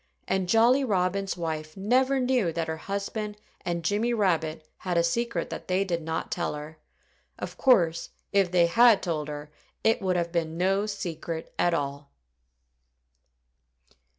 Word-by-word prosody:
And 190 -2 0
Jolly 240 +6 +5
Robin's 195 -3 0
wife 155 -1 -4
never 260 +7 +2
knew 250 -8 +2
that 165 -1 -2
her 160 0 -3
husband 205 +3 -4 0.3
and 170 -1 -2
Jimmy 220 +5 +1
Rabbit 165 -6 0
had 180 -2 -2
a 170 - +4
secret 185 +1 -1
that - - -6
they 185 +1 +2
did 170 -3 -2
not 160 0 -3
tell 175 -3 -1
her. 150 +1 -9 0.6
Of - - -6
course, 175 -11 +3 0.2
if 195 -2 +3
they 175 -1 +4
had 230 +4 +5
told 155 -5 -2
her 150 0 -7 0.3
it 225 - +3
would 185 -2 +1
have 170 -1 -1
been 165 -1 -1
no 195 +3 +1
secret 170 -5 -5
at 175 -1 +3
all. 140 -1 -4
180 Hz, 150 wpm, -27 LUFS, 165-205 Hz, 0.6 s, Jolly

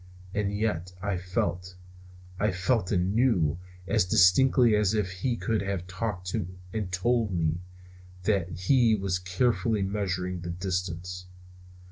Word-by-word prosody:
And 100 -1 0
yet 90 -5 -2
I 100 -1 0
felt, 90 0 -2 0.6
I 105 - +2
felt 95 +2 0
and 90 0 +1
knew, 90 - +2 0.3
as 110 -2 +3
distinctly 110 +7 +5
as 105 0 +2
if 100 -4 0
he 105 +7 -1
could 115 -1 -1
have 100 -2 -3
talked 95 -1 -4 0.4
and 105 -4 -3
told 110 +4 +1
me, 85 -2 0 0.6
that 95 -3 +1
he 115 +2 +4
was 95 -3 -1
carefully 110 +3 +1
measuring 90 -2 -2
the 85 - -5
distance. 90 0 -3
95 Hz, 130 wpm, -28 LUFS, 90-110 Hz, 0.6 s, distinctly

